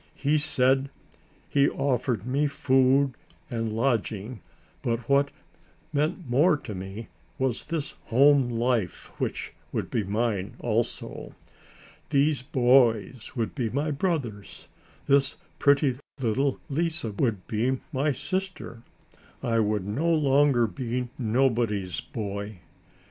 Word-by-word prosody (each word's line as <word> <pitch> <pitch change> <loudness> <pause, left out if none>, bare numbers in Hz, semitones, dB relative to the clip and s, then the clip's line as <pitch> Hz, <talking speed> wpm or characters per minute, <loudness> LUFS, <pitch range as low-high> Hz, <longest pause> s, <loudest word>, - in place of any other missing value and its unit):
He 145 +2 +2
said 135 -2 +3 0.6
he 140 0 +3
offered 125 -5 -1
me 140 +4 +1
food 135 -1 +3 0.4
and 115 -2 -2
lodging, 110 -2 -1 0.4
but 115 0 -2
what 140 0 +3 0.6
meant 155 +3 -1
more 150 +7 +4
to 110 - -8
me 95 +4 -7 0.3
was 130 -4 -1
this 155 -3 -3
home 135 +1 +5
life 115 -5 -1
which - - -3 0.2
would - - -3
be 110 - 0
mine 105 -1 -1
also. 115 0 -3 0.7
These 140 0 +2
boys 125 -4 +2
would 115 -3 -2
be 120 -5 -1
my 145 +6 -1
brothers. 140 - -3 0.4
This 140 -1 +3 0.2
pretty 140 -2 +3 0.2
little 130 +3 0
Lise 165 +3 -1
would 105 -2 -1
be 125 +4 0
my 140 +3 +1
sister. 185 -5 -4 0.6
I 115 -1 +1
would 105 -3 0
no 145 +12 0
longer 140 -5 +4
be 125 +1 -3
nobody's 110 - +1
boy. 100 -1 -5
130 Hz, 115 wpm, -27 LUFS, 115-140 Hz, 0.7 s, home